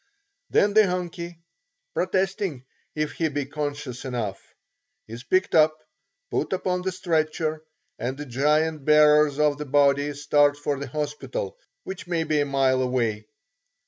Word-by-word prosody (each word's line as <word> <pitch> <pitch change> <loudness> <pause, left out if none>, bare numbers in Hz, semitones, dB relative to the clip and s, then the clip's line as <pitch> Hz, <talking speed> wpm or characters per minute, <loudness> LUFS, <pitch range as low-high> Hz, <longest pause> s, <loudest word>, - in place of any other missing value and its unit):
Then 205 0 +3
the 215 -1 +6
"Hunkie" 175 -1 -4 0.6
protesting 185 -6 -1 0.3
if 155 -1 -1
he 160 -1 -1
be 145 -1 -2
conscious 145 -3 -5
enough 115 -7 -3 0.7
is 115 +3 -8
picked 185 +8 +1
up, 155 -1 +5 0.5
put - - -1
upon 180 -1 -1
the 190 +1 -2
stretcher, 155 -3 -1 0.4
and 130 +3 -3
the 150 - -6
giant 150 +4 +1
bearers 150 -1 +5
of 150 -1 +2
the 150 - -4
body 145 +1 +3
start 145 0 +3
for 145 -1 -2
the 140 - -5
hospital, 150 - -4 0.3
which 190 -2 -7
may 170 -2 0
be 155 -1 +1
a 145 - +2
mile 135 -2 +2
away. 115 -4 -1
150 Hz, 145 wpm, -25 LUFS, 140-165 Hz, 0.7 s, the